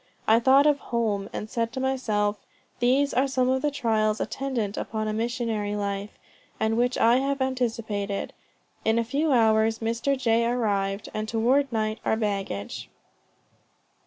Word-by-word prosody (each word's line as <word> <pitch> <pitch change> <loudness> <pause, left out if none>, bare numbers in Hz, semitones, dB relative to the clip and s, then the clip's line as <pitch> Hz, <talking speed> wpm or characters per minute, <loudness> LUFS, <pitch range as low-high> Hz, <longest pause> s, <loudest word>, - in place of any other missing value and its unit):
I 225 +1 +6
thought 270 +4 +5
of 295 -2 +3
home 215 -4 -2
and 210 - -5
said 230 +1 -2
to 260 - -4
myself, 215 -6 0 0.4
These 265 +3 +2
are 265 +2 +2
some 255 -1 +1
of 260 0 +1
the 295 - +1
trials 220 -6 0
attendant 240 -7 -2
upon 215 -1 -3
a 215 - -1
missionary 225 -2 -2
life, 200 0 -4 0.4
and 220 0 +1
which 245 +2 +1
I 235 +2 +5
have 275 +1 -1
anticipated. 225 -6 -2 0.5
In 220 +1 +2
a 230 - +2
few 285 +6 0
hours 220 -2 +3
Mr. 235 +5 -1
J. 230 -2 +2
arrived, 200 -4 -1
and 215 0 -3
toward 255 +5 +2
night 220 -1 -1
our - - +1
baggage." 195 - -3
230 Hz, 155 wpm, -26 LUFS, 215-260 Hz, 0.5 s, I